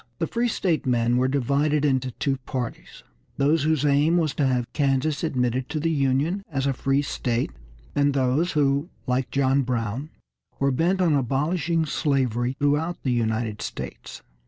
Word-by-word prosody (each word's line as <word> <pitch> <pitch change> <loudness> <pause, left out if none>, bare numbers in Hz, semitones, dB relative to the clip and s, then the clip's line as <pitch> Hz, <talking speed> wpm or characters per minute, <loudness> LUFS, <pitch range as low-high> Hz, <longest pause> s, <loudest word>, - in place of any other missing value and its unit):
The - - 0
free 235 +7 0
state 175 - 0
men 120 -1 +2
were 130 +1 +2
divided 140 +3 +1
into 130 -2 +1
two 135 +2 -1
parties, 125 -2 -6 0.3
those 145 +3 +3
whose 155 -1 +1
aim 145 +4 +3
was 155 -4 +1
to 145 - +1
have 125 -2 +1
Kansas 140 +1 0
admitted 125 -4 0
to 155 0 -2
the 165 +2 0
Union 145 +6 +1
as 135 -4 -2
a 135 - +1
free 135 +2 +1
state, 120 - -1 0.4
and 145 -1 +2
those 135 +6 +1
who, 145 +1 +1 0.2
like 125 +1 0
John 135 0 +2
Brown, 125 +2 -2 0.5
were 140 0 +2
bent 175 +8 +1
on 170 -4 +3
abolishing 150 +5 0
slavery 130 -5 0
throughout 150 +4 0
the 130 - 0
United 110 -2 -1
States. - - -7
140 Hz, 160 wpm, -24 LUFS, 130-155 Hz, 0.5 s, those